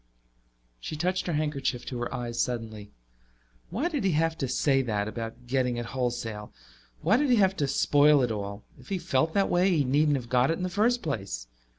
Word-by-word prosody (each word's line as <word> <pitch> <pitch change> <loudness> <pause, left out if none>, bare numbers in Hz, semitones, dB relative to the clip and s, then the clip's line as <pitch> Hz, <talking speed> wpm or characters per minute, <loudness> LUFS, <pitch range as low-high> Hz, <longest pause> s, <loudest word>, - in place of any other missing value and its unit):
She 155 - -6
touched 180 +4 -1
her 170 - -1
handkerchief 145 -5 -1
to 125 - -5
her 120 - -3
eyes 120 -1 -4
suddenly. 110 -4 -4 0.8
Why 230 - -1
did 300 - -2
he 190 -3 +2
have 165 +1 +1
to 135 - -1
say 135 +2 +2
that, 105 -5 -1
about 115 +2 -6
getting 125 -1 0
it 120 - -3
wholesale? 120 -5 -3 0.5
Why 205 +8 +4
did 290 +1 +1
he 245 - +5
have 195 -3 +3
to 145 - 0
spoil 145 +1 +4
it 120 - 0
all? 100 -1 -5 0.2
If - - -15
he 195 - 0
felt 160 -1 0
that 200 -1 +3
way 180 +2 +3
he 145 - +3
needn't 145 +2 +2
have 120 -3 -7
got 125 +1 +3
it 165 - +1
in 185 - -4
the 185 - -1
first 225 +6 +1
place. 95 - -4
135 Hz, 210 wpm, -27 LUFS, 120-170 Hz, 0.8 s, he